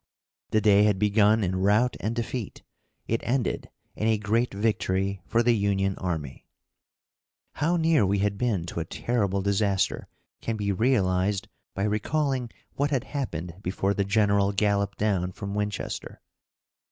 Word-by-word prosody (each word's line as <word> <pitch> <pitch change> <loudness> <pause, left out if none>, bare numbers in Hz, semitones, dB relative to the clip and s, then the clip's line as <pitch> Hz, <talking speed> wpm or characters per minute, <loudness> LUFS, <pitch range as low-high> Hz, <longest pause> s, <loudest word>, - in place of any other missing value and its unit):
The 110 - +2
day 105 -1 +5
had 105 -2 +2
begun 105 +2 +3
in 95 0 -1
route 105 +6 +3
and 110 +3 -2
defeat; 120 -2 -4 0.4
it 115 - 0
ended 125 0 -1 0.3
in 110 - -1
a 110 -1 +3
great 110 +3 0
victory 100 -2 -1
for 115 +1 +2
the 120 0 +4
Union 100 -2 +1
army. 80 -7 -4 1.0
How 165 +5 0
near 160 -6 +3
we 100 +1 +2
had 100 0 0
been 105 -6 -1
to 85 - -5
a 80 - -2
terrible 100 -1 -1
disaster 100 -1 0 0.3
can 115 -1 -2
be 100 -1 -1
realized 100 -2 +1 0.3
by 100 - -1
recalling 125 +4 0 0.2
what 145 +1 0
had 135 -5 0
happened 90 - -3
before 95 +1 0
the 100 - 0
general 100 0 +2
galloped 100 0 +1
down 95 -4 0
from 100 +2 -6
Winchester. 105 -1 -4
105 Hz, 150 wpm, -26 LUFS, 95-115 Hz, 1.0 s, day